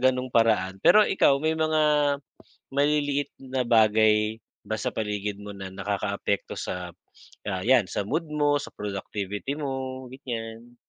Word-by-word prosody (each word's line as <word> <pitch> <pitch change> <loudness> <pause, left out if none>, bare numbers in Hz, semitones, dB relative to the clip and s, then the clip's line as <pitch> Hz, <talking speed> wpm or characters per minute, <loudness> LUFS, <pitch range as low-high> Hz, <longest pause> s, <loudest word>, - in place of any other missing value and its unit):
ganung 130 0 +1
paraan. 95 -5 +2
Pero 215 0 +7
ikaw, 140 -7 +4
may 155 +3 0
mga 150 -2 +2 0.6
maliliit 145 -1 +1
na 130 -1 -2
bagay 110 -1 +4 0.3
ba 110 - -1
sa 110 - -2
paligid 105 -1 -3
mo 105 -1 -8
na 95 -1 -7
nakaka-apekto 100 +1 -2
sa, 90 -1 -4 0.6
ah, 95 -2 -2
yan 120 -5 +4
sa 100 - -2
mood 160 - -2
mo, 145 -1 +1
sa - - -7
productivity 105 +4 -4
mo, 130 -3 -4
ganyan. 120 -2 -7
115 Hz, 140 wpm, -26 LUFS, 105-140 Hz, 0.6 s, Pero